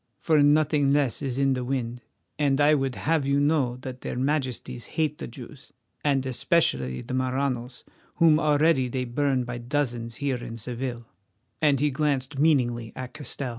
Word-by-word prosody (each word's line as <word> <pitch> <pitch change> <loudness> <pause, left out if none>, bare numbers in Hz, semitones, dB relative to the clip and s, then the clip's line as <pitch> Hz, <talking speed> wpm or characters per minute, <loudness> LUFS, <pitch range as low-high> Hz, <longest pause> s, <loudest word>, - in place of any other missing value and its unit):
For 155 -3 +3
nothing 145 -1 +3
less 140 -4 +1
is 135 -3 -3
in 135 -1 +3
the 125 -1 -2
wind, 125 -2 -3 0.4
and 140 -2 +2
I 145 +1 +5
would 135 -3 0
have 160 -1 +1
you 140 0 +2
know 145 -4 +1
that 130 -1 -7
their - - -4
Majesties 130 -3 -2
hate 155 -2 0
the - - -5
Jews, 130 +3 -12 0.3
and 135 -2 +1
especially 115 - 0
the - - -6
Maranos, 130 -1 -2 0.3
whom 160 -3 +5
already 150 -3 +3
they 125 +1 -2
burn 130 +1 0
by 120 0 -5
dozens 120 -3 -2
here 140 -2 -1
in 115 -1 -7
Seville," 120 +1 -5 0.6
and 145 -3 +3
he 150 +1 +2
glanced 135 -1 -1
meaningly 120 -7 +2
at 130 -1 -7
Castell. 140 -2 -5
135 Hz, 170 wpm, -26 LUFS, 125-145 Hz, 0.6 s, I